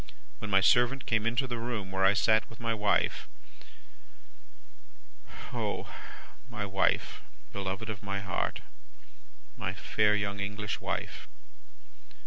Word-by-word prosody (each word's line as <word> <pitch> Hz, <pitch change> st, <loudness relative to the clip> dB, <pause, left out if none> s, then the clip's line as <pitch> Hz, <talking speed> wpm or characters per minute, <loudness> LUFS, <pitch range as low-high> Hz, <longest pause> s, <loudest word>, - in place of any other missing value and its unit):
When 110 Hz, -, -5 dB
my 95 Hz, -1 st, +5 dB
servant 120 Hz, +6 st, +4 dB
came 110 Hz, 0 st, +2 dB
into 125 Hz, +4 st, +2 dB
the 120 Hz, -2 st, -3 dB
room 115 Hz, -5 st, -3 dB
where 95 Hz, 0 st, +1 dB
I 95 Hz, +1 st, +6 dB
sat 110 Hz, 0 st, +4 dB
with 115 Hz, -, -13 dB
my 115 Hz, -1 st, 0 dB
wife 105 Hz, -2 st, +1 dB, 2.3 s
O -, -, -2 dB, 0.6 s
my 100 Hz, -, -3 dB
wife, 95 Hz, 0 st, +1 dB, 0.3 s
beloved 100 Hz, +2 st, -3 dB
of 105 Hz, -2 st, -5 dB
my 100 Hz, -1 st, -2 dB
heart! 95 Hz, -3 st, -2 dB, 0.9 s
My -, -, -3 dB
fair 105 Hz, 0 st, +3 dB
young 100 Hz, -1 st, -1 dB
English 105 Hz, +1 st, -3 dB
wife! -, -, -3 dB
105 Hz, 120 wpm, -30 LUFS, 100-115 Hz, 2.3 s, I